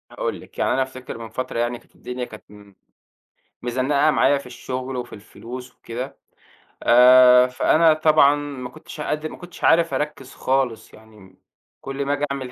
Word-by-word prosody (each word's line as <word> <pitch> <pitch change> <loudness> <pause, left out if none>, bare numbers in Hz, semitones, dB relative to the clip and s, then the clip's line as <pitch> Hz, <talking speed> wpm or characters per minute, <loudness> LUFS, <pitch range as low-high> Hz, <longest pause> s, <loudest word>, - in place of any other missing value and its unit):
هاقول - - -4
لِك، - - -17
يعني - - +1
أنا 135 - +1
أفتكر 130 -2 -9
من 115 -1 -8
فترة 115 +1 -4
يعني 120 0 -1
كانت - - -29
الدنيا 125 0 -6
كانت 110 -3 -13
م 100 -1 -16 0.9
مزنّقة 130 +5 +1
معايا 145 -1 +3
في 140 - -12
الشغل 130 +1 -6
وفي 125 -1 -6
الفلوس 125 +4 -10
وكده، 125 +4 -7 0.7
آآ، 125 +1 +7
فأنا 155 +5 +3
طبعًا 155 -2 +4
ما 140 -4 -6
كنتش 150 +4 -11
قادر 155 +1 -3
ما - - -11
كنتش 175 -1 -12
عارف 165 0 +4
أركّز 150 -3 -4
خالص 130 -5 -1
يعني 110 0 -17
م 95 -1 -18 0.4
كل 135 +1 -4
ما 140 - 0
آجي 145 0 -1
أعمِل 135 -2 -5
130 Hz, 175 wpm, -22 LUFS, 120-145 Hz, 0.9 s, آآ